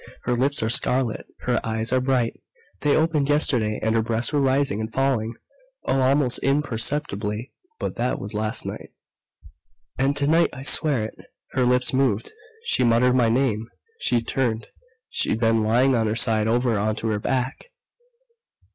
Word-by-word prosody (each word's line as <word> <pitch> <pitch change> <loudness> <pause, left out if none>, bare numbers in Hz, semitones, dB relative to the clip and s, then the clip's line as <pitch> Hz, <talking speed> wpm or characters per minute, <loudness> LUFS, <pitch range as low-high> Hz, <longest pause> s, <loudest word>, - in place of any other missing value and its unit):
Her 125 - 0
lips 135 +1 +1
are 110 - 0
scarlet! 125 -2 0
Her 125 -2 0
eyes 110 +1 -2
are 130 - +3
bright 130 -3 +1 0.5
they 145 -1 +2
opened 155 -3 +1
yesterday 120 -8 +1
and 110 0 +1
her 115 - +2
breasts 115 +5 -1
were 145 - +2
rising 135 -5 +1
and 110 0 -4
falling 120 -3 0 0.5
oh, 135 - +1
almost 130 -1 +2
imperceptibly 125 -5 -1 0.2
but - - -4
that 120 +2 0
was 100 +2 -7
last 110 +1 -1
night. - - -6 1.1
"And 140 +2 +1
tonight 155 +4 +3
I 130 +1 -8
swear 140 -4 +2
it 110 - -10 0.3
her 130 -2 +1
lips 125 +1 +2
moved! 130 -5 0 0.3
She 130 - +1
muttered 120 +1 +4
my 120 -3 +3
name! 115 -2 0 0.3
She 120 -1 +1
turned 115 -3 -1 0.4
she'd 110 - -1
been 115 -1 +2
lying 120 +5 +3
on 115 -2 +1
her 110 - -1
side 110 -2 +2
over 120 -1 +1
onto 110 +2 -1
her 105 -1 0
back!" 130 +3 -2
125 Hz, 160 wpm, -23 LUFS, 110-135 Hz, 1.1 s, muttered